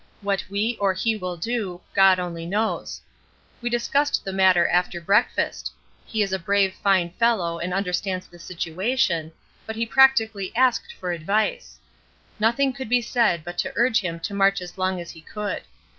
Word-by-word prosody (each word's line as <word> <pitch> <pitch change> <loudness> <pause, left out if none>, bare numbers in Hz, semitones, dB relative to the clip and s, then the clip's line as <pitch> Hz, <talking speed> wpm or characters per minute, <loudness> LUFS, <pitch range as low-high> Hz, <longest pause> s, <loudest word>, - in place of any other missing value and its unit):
What 200 -1 -1
we 215 +4 -1
or 200 -2 +2
he 220 +4 0
will 180 -4 -5
do, 200 -2 -3
God 195 -1 +6
only 170 -2 -5
knows. 215 +4 -2 0.6
We 240 - -1
discussed 280 +5 0
the 195 - -4
matter 185 -2 +4
after 180 0 +1
breakfast; 200 +7 +1 0.4
he 220 -2 0
is 195 -1 -3
a 190 - 0
brave 195 +2 +2
fine 190 -4 +1
fellow 185 -6 +1
and 175 +2 -3
understands 185 0 -2
the 175 - -17
situation, 170 0 -1 0.4
but 220 - -4
he 230 +1 -1
practically 225 -6 +3
asked 260 - +2
for 180 - -5
advice. 200 +6 -1 0.6
Nothing 255 +5 +2
could 260 -3 -7
be 245 0 +3
said 230 -9 +1
but 175 +1 -7
to - - -1
urge 240 0 +3
him 170 -3 -4
to 200 - -4
march 195 0 +3
as 180 -1 -9
long 185 -1 -1
as 170 - -7
he 165 - -13
could. 210 +5 -4
195 Hz, 175 wpm, -24 LUFS, 180-225 Hz, 0.6 s, God